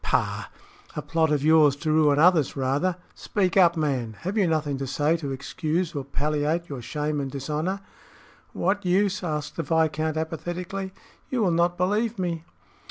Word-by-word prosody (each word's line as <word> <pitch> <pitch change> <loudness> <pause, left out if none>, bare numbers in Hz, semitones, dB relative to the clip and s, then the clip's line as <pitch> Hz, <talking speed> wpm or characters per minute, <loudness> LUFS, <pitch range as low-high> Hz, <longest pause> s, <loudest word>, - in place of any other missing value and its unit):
"Pah! - - 0 0.5
a - - -3
plot 160 -1 +1
of 145 -2 +1
yours 155 -2 +5
to 155 +2 -2
ruin 150 -2 +4
others 160 -3 +4
rather. 140 +7 0 0.2
Speak 190 -4 -1
up, 175 -3 +5
man! 130 -7 -1
Have 190 +4 -3
you 200 -4 +3
nothing 150 -4 0
to 135 - -3
say 150 +4 +1
to 145 -4 -5
excuse 160 +5 -2
or 140 -3 -3
palliate 150 +5 -1
your 135 -4 -5
shame 150 +4 -2
and 135 - -3
dishonor?" 155 +8 -3 0.7
"What 200 +3 0
use?" 190 +2 +1
asked 150 -3 -3
the - - 0
viscount, 160 0 0
apathetically. 175 +4 -4 0.4
"You 250 -4 0
will 185 - +3
not 170 +1 +2
believe 210 +5 0
me." 170 -3 -2
160 Hz, 165 wpm, -25 LUFS, 145-180 Hz, 0.7 s, yours